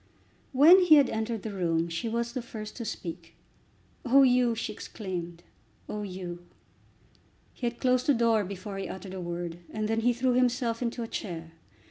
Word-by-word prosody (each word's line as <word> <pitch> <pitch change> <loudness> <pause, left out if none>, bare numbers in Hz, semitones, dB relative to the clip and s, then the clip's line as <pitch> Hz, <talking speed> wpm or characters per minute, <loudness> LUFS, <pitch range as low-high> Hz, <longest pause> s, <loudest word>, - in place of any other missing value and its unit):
When 310 +8 +8
he 355 -4 +7
had 285 -3 +5
entered 220 -1 -2
the 220 - -5
room 170 -3 0
she 170 +8 -3
was 235 +1 -2
the 255 - -3
first 215 -2 -8
to 235 - -5
speak. 170 -4 -7 0.7
"Oh, 270 +2 +6
Hugh!" 250 -2 +4
she 220 -1 -4
exclaimed, 175 -5 -6 0.4
"oh, 210 - -4
Hugh!" 180 -3 -6 1.1
He 245 - -3
had 235 0 -4
closed 255 -1 +2
the 285 - +5
door 230 -2 +3
before 195 +1 -6
he 195 - -4
uttered 190 0 -7
a 190 - -5
word, 175 -1 -5
and 215 -1 -2
then 225 +1 0
he 240 +2 +3
threw 250 +1 +1
himself 245 -2 +1
into 235 0 -2
a - - -5
chair. 165 -7 -6
220 Hz, 180 wpm, -28 LUFS, 185-245 Hz, 1.1 s, When